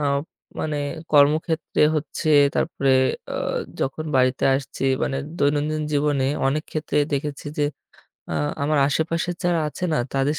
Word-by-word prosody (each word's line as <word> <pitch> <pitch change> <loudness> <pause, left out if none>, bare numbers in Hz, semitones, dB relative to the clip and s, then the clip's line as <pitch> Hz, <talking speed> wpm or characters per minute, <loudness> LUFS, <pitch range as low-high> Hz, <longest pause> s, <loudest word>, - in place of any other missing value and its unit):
আ - - 0 0.6
মানে 155 -1 -2 0.4
কর্মক্ষেত্রে 155 +2 +3
হচ্ছে 155 +1 -3 0.3
তারপরে 140 -4 0 0.4
আ - - -3 0.5
যখন 140 +4 -2
বাড়িতে 130 0 +2
আসছি 135 0 -4 0.2
মানে 135 - 0 0.2
দৈনন্দিন 150 +2 +1
জীবনে 145 -2 +1 0.2
অনেক 150 +3 0
ক্ষেত্রে 155 -1 -1
দেখেছি 145 +1 -3
যে 145 - +3 0.7
আ - - -2 0.3
আমার 150 +1 +2
আশেপাশে 165 +4 0
যারা 175 -2 +2
আছে 165 - -6
না 155 - +2 0.2
তাদের 135 +3 +1
150 Hz, 135 wpm, -23 LUFS, 140-155 Hz, 0.7 s, কর্মক্ষেত্রে